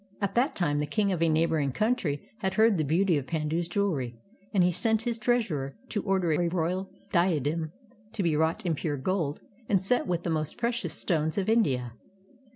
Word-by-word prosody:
At 200 -2 -1
that 255 +5 +2
time 145 -5 +1
the 150 - -1
king 200 +5 +1
of 175 -3 -1
a 165 - +4
neighboring 155 -3 +1
country 210 - 0
had 190 -2 -1
heard 220 +2 +5
of 200 - 0
the - - +2
beauty 165 +2 +2
of 135 - -8
Pandu's 160 +1 -1
jewelry, 165 -11 -1 0.3
and 190 -3 +3
he 180 - +4
sent 220 +5 +1
his 235 -1 -1
treasurer 205 - 0
to 205 - -1
order 190 -4 +1
a 170 +3 +2
royal 180 +2 -1 0.2
diadem 160 -3 +1 0.4
to 200 - -2
be 165 -3 +2
wrought 160 +4 0
in 170 - +1
pure 150 -1 -2
gold 160 0 -1 0.3
and 195 - +4
set 195 +6 +1
with 175 -1 -1
the 170 - -1
most 155 -1 -2
precious 235 -9 -1
stones 160 -1 0
of 195 - 0
India. 130 - +2
170 Hz, 200 wpm, -28 LUFS, 155-200 Hz, 0.4 s, heard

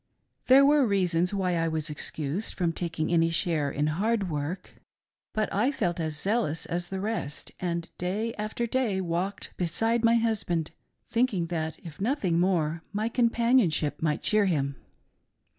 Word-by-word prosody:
There 270 +2 +8
were 290 -2 +5
reasons 180 -3 +2
why 190 -3 0
I 165 0 +1
was 160 -1 -1
excused 150 +4 -4
from 170 -3 0
tak 170 -1 -4
ing 160 +2 0
any 165 -1 +4
share 165 -3 +1
in 145 +2 -1
hard 195 +4 0
work; 155 +5 -5 0.5
but 215 0 0
I 225 +8 +2
felt 175 -11 -1
as 155 -2 -2
zealous 200 -7 0
as 175 +1 -3
the 190 +1 -4
rest, 200 -8 -3
and 170 -2 -2
day 210 +6 -1
after 215 +3 -3
day 235 -5 0
walked 185 +3 -3
beside 225 +7 +1
my 230 0 +5
husband 205 -8 0 0.4
thinking 230 -7 +1
that, 160 -1 -2
if 165 +2 -9
nothing 200 - +1
more, 170 -3 +1
my 215 +3 -1
companionship 235 - +2
might 155 -1 0
cheer 215 -1 +3
him. 140 -6 0
180 Hz, 160 wpm, -27 LUFS, 165-220 Hz, 0.5 s, There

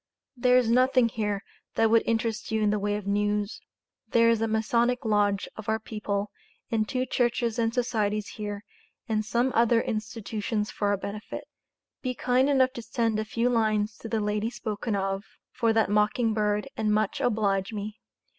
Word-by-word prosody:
There 250 0 +4
is 250 -2 +3
nothing 255 -1 +4
here 210 -2 -2 0.3
that 225 -1 +3
would 230 0 +6
interest 225 -1 -1
you 220 -1 0
in 210 - +3
the 210 - 0
way 205 +1 0
of 210 -1 -5
news. 205 +1 0 0.5
There 230 0 +5
is 230 -1 +1
a 225 - +2
Masonic 235 +3 +1
Lodge 205 -2 +2
of 220 -1 -7
our 220 - +2
people 210 -2 -3 0.4
and 220 -2 0
two 255 -1 0
churches 240 -2 0
and 225 -1 +2
societys 215 -4 -1
here 205 -1 -5 0.4
and 215 -2 0
some 235 +5 +1
other 230 0 +4
institutions 215 0 -3
for 205 - -1
our 200 0 +2
benefit. 205 +3 -6 0.6
Be 255 -1 -2
kind 255 +3 +2
enough 260 -2 +3
to 235 - -6
send 225 -1 0
a - - 0
few 230 +2 0
lines 215 -3 +1
to 225 - -7
the 225 -1 0
Lady 210 +1 0
spoken 220 -2 -3
of 195 0 -1 0.3
for 230 -1 +1
that 225 -1 +3
mocking 210 +2 +2
bird 210 -1 0
and 215 -1 0
much 215 +6 +1
oblige 210 -6 +1
me. 210 0 -5
220 Hz, 180 wpm, -27 LUFS, 210-235 Hz, 0.6 s, would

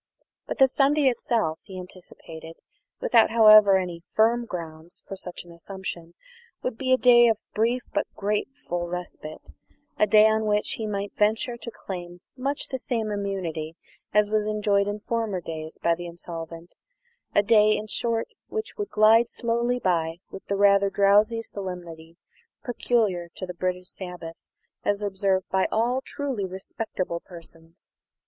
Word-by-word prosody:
But - - -4
the 265 -2 +7
Sunday 275 +1 +3
itself, 225 -9 -1
he 185 -1 -9
anticipated, 165 -3 -11 0.4
without, 230 -2 +4
however, 215 -3 +8
any 180 -2 -3
very 170 - -32
firm 235 +2 +3
grounds 165 -2 -7
for 195 - -6
such 180 -2 -8
an 175 - -15
assumption, 170 -1 -7 0.5
would 255 - -2
be 260 +2 -2
a 255 - +6
day 240 -1 +7
of 225 -2 +3 0.2
brief 235 +3 +1
but - - 0
grateful 205 -3 -2
respite; 175 -3 -7 0.5
a 210 - +4
day 215 +1 +7
on 220 0 +1
which 210 0 +1
he 220 - -3
might 200 -1 -3
venture 220 +3 +1
to 235 - -8
claim 175 -5 -8
much 275 +2 -2
the 260 - -3
same 225 -4 -2
immunity 185 -6 -3 0.4
as 210 0 +3
was 215 -1 +1
enjoyed 205 -1 +1
in 205 0 -3
former 225 -4 -2
days 160 -2 -7
by 170 - +4
the 175 +1 -6
insolvent; 170 0 -8 0.6
a 205 - +5
day, 215 0 +5
in 215 - -5
short, 230 +1 -1 0.2
which 435 0 -5
would 415 -2 -3
glide 225 +2 +5
slowly 235 +1 0
by 165 -6 0
with 195 - -9
the 200 - -1
rather 200 0 +5
drowsy 205 +4 +3
solemnity 170 -5 -8 0.5
peculiar 215 -8 0
to 185 - -5
the 180 - -7
British 180 0 -3
sabbath 175 -3 -7 0.5
as 205 0 0
observed 190 -1 0
by 190 0 +2
all 240 +4 +1
truly 270 -8 -3
respectable 190 -1 -4
persons. 165 -1 -14
200 Hz, 155 wpm, -25 LUFS, 175-225 Hz, 0.6 s, however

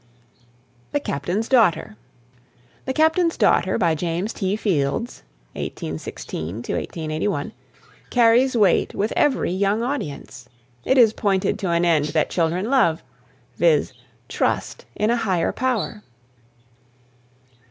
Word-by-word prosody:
THE 290 - +2
CAPTAIN'S 185 - -3
DAUGHTER. 220 - +2 0.9
"The 265 - -2
Captain's 320 +3 +2
Daughter," 185 - +2
by 170 -2 +2
James 170 +6 -2
T. 195 -1 -1
Fields 190 - -1 0.3
(1816 80 +5 -6 0.5
81), 155 +2 -2 0.6
carries 245 +2 +4
weight 200 -5 +2
with 210 +3 -1
every 280 -10 +1
young 200 +4 0
audience. 145 - -5 0.4
It 260 - +2
is 225 -4 +6
pointed 195 -4 0
to 190 - -2
an 170 0 +2
end 160 -4 +3
that 155 - +1
children 180 +6 0
love 220 -13 +2 0.5
viz., - - +2 0.3
trust - - -2
in 215 +2 +1
a 240 - +2
higher 190 -7 0
power. 245 -4 -2
200 Hz, 110 wpm, -22 LUFS, 165-240 Hz, 0.9 s, is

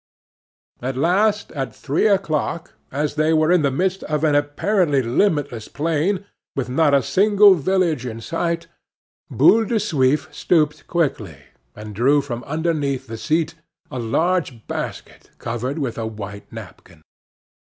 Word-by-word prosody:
At 130 +1 -3
last, 200 +7 +1
at 135 -4 -4
three 145 +9 0
o'clock, 170 -5 -1 0.2
as 145 +2 -1
they 155 +1 +2
were 155 +1 +3
in 180 -2 +4
the 140 - +2
midst 185 +7 -1
of 150 0 -2
an 155 -2 +3
apparently 145 +1 +1
limitless 135 - 0
plain, 165 +6 -1 0.3
with 130 -2 -2
not 145 +2 +3
a 135 - +3
single 200 +7 +5
village 175 -4 0
in 115 -3 -5
sight, 170 +5 -2 0.6
Boule 225 +1 +5
de 230 - -2
Suif 150 -10 +1
stooped 155 -3 +1
quickly, 125 - -1 0.4
and 105 0 -9
drew 135 +8 +3
from 125 -4 -5
underneath 150 -4 -1
the 115 -2 -7
seat 160 +7 0 0.4
a 130 - -4
large 140 0 -1
basket - - -6
covered 120 +5 -4
with 130 -7 -3
a 110 - -2
white 100 -2 -8
napkin. 80 -2 -12
150 Hz, 140 wpm, -21 LUFS, 130-170 Hz, 0.6 s, single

